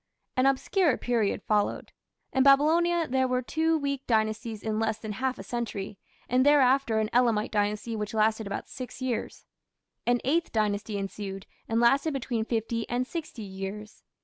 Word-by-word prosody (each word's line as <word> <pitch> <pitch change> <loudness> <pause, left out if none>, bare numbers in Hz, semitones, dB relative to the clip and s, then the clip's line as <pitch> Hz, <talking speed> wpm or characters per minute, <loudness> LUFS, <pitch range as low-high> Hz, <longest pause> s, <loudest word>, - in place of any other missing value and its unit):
An 255 +1 +3
obscure 290 +3 +2
period 230 -4 0
followed. 210 -1 0 0.4
In 265 - +3
Babylonia 320 +5 +4
there 260 0 +1
were 255 0 0
two 320 +4 +1
weak 280 -2 -3
dynasties 220 -1 0
in 220 -1 -1
less 220 -1 0
than 220 -1 -6
half 255 +4 -2
a - - -8
century, 210 -5 -4 0.3
and 255 +1 +3
thereafter 270 -4 +4
an 220 0 +1
Elamite 230 -3 +2
Dynasty 210 +2 -1
which 210 0 -4
lasted 220 0 +2
about 200 - -4
six 255 -2 -8
years. 255 -3 -3 0.6
An 245 0 +3
Eighth 325 +6 +1
Dynasty 210 -1 -1
ensued, 195 0 -5 0.2
and 225 +1 +1
lasted 275 +6 +3
between 235 -4 -2
fifty 230 0 -2
and 245 +1 0
sixty 300 -6 -6
years. 195 +2 -7
235 Hz, 160 wpm, -28 LUFS, 215-265 Hz, 0.6 s, Babylonia